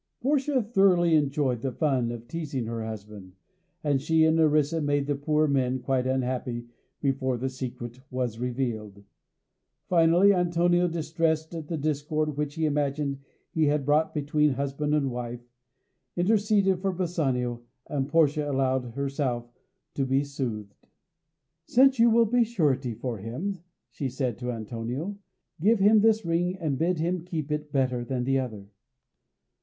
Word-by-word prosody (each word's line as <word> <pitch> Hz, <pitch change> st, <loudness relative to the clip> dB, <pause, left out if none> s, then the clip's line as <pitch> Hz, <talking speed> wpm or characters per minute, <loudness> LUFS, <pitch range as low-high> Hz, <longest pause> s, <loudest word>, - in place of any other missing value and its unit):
Portia 270 Hz, -1 st, +1 dB
thoroughly 195 Hz, -6 st, +3 dB
enjoyed 140 Hz, -5 st, +1 dB
the 135 Hz, -, -2 dB
fun 130 Hz, -4 st, 0 dB
of 120 Hz, 0 st, -8 dB
teasing 145 Hz, -4 st, -4 dB
her 115 Hz, 0 st, -4 dB
husband, 105 Hz, -3 st, -8 dB, 0.5 s
and 145 Hz, -3 st, +1 dB
she 160 Hz, +2 st, +3 dB
and 160 Hz, 0 st, +3 dB
Nerissa 155 Hz, 0 st, +3 dB
made 145 Hz, -1 st, +1 dB
the 145 Hz, -, 0 dB
poor 150 Hz, +2 st, +1 dB
men 130 Hz, -2 st, +1 dB
quite 130 Hz, 0 st, -1 dB
unhappy 125 Hz, -2 st, -2 dB, 0.4 s
before 130 Hz, -2 st, 0 dB
the 130 Hz, +3 st, -2 dB
secret 125 Hz, -2 st, -7 dB
was 125 Hz, -3 st, -3 dB
revealed. 120 Hz, -5 st, -3 dB, 0.9 s
Finally 175 Hz, +3 st, +5 dB
Antonio, 175 Hz, 0 st, +2 dB
distressed 160 Hz, -1 st, -1 dB
at 160 Hz, -3 st, -6 dB
the 165 Hz, -, -3 dB
discord 150 Hz, 0 st, -1 dB
which 145 Hz, 0 st, -3 dB
he 160 Hz, -, 0 dB
imagined 145 Hz, -1 st, -1 dB, 0.3 s
he 160 Hz, -2 st, +2 dB
had 145 Hz, -1 st, +1 dB
brought 150 Hz, +2 st, +2 dB
between 150 Hz, 0 st, +1 dB
husband 140 Hz, +3 st, -1 dB
and 140 Hz, -3 st, 0 dB
wife, 120 Hz, 0 st, -6 dB, 0.7 s
interceded 200 Hz, 0 st, +2 dB
for 195 Hz, 0 st, 0 dB
Bassanio, 135 Hz, -10 st, -1 dB, 0.2 s
and 140 Hz, -2 st, -2 dB
Portia 150 Hz, -2 st, +2 dB
allowed 130 Hz, -3 st, 0 dB
herself 135 Hz, -4 st, -2 dB, 0.4 s
to 140 Hz, -, -1 dB
be 135 Hz, +1 st, +1 dB
soothed. 120 Hz, -8 st, -5 dB, 0.9 s
"Since 265 Hz, 0 st, +4 dB
you 235 Hz, +1 st, +6 dB
will 230 Hz, +1 st, +5 dB
be 240 Hz, +2 st, +3 dB
surety 140 Hz, -, 0 dB
for 120 Hz, -1 st, -4 dB
him," 155 Hz, -, -4 dB, 0.3 s
she 140 Hz, -3 st, -3 dB
said 125 Hz, -3 st, -3 dB
to 125 Hz, -1 st, -3 dB
Antonio, 120 Hz, -, -5 dB, 0.4 s
"give 215 Hz, +8 st, +4 dB
him 210 Hz, +2 st, +6 dB
this 220 Hz, -2 st, +3 dB
ring, 175 Hz, +2 st, 0 dB
and 150 Hz, -7 st, -2 dB
bid 175 Hz, +2 st, +1 dB
him 170 Hz, +2 st, -1 dB
keep 155 Hz, -4 st, -4 dB
it 150 Hz, 0 st, -3 dB
better 130 Hz, -3 st, 0 dB
than 125 Hz, 0 st, -2 dB
the 135 Hz, +1 st, +1 dB
other." 110 Hz, -6 st, -5 dB
145 Hz, 150 wpm, -27 LUFS, 125-165 Hz, 0.9 s, you